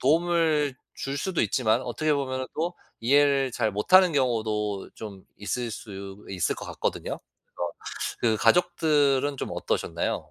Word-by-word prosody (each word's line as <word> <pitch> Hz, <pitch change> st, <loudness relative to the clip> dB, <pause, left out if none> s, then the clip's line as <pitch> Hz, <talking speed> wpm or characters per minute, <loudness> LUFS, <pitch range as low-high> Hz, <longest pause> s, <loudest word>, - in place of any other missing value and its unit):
도움을 160 Hz, -2 st, +2 dB, 0.2 s
줄 135 Hz, +1 st, -4 dB
수도 185 Hz, +3 st, 0 dB
있지만 120 Hz, 0 st, +2 dB
어떻게 145 Hz, +6 st, 0 dB
보면은 130 Hz, -2 st, -2 dB
또 170 Hz, +3 st, -1 dB, 0.3 s
이해를 140 Hz, +2 st, +4 dB
잘 110 Hz, -4 st, 0 dB
못하는 180 Hz, -, +5 dB
경우도 110 Hz, -6 st, 0 dB
좀 100 Hz, -4 st, -9 dB
있을 115 Hz, +3 st, -3 dB
수 100 Hz, -1 st, -8 dB
있을 90 Hz, -3 st, 0 dB
것 -, -, -7 dB
같거든요. -, -, -3 dB, 0.4 s
그래서 85 Hz, -, -2 dB, 0.5 s
그 110 Hz, -2 st, +3 dB
가족들은 150 Hz, -6 st, +3 dB
좀 -, -, -3 dB
어떠셨나요? 85 Hz, 0 st, -2 dB
130 Hz, 295 characters per minute, -26 LUFS, 110-150 Hz, 0.5 s, 못하는